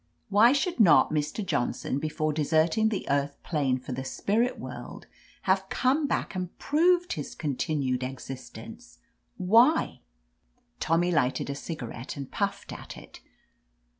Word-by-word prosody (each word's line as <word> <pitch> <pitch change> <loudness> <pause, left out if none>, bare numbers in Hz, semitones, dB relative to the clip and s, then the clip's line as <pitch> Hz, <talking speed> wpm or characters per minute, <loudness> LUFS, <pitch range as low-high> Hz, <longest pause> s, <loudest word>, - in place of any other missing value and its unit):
Why 210 +4 +6
should 290 +2 0
not 180 -9 +6
Mr. 155 +7 -1
Johnson, 135 -3 -1
before 155 0 -1
deserting 160 +8 +2
the 210 - -3
earth 140 0 0
plane 140 -6 0
for 130 +1 -9
the 130 +1 -3
spirit 220 - 0
world, - - -8 0.4
have 190 0 +1
come 280 +4 +1
back - - -2
and 180 -2 -5
proved 350 +4 +2
his 145 - -6
continued 135 -3 -1
ex 130 +1 -6
istence? 135 - -10 0.4
Why?'' 230 - +4 0.8
Tommy 170 +2 +2
lighted 140 -3 +1
a - - -4
cigarette 135 -4 -6
and 140 -2 -7
puffed 200 -1 -3
at - - -9
it. - - -13
165 Hz, 135 wpm, -27 LUFS, 140-220 Hz, 0.8 s, Why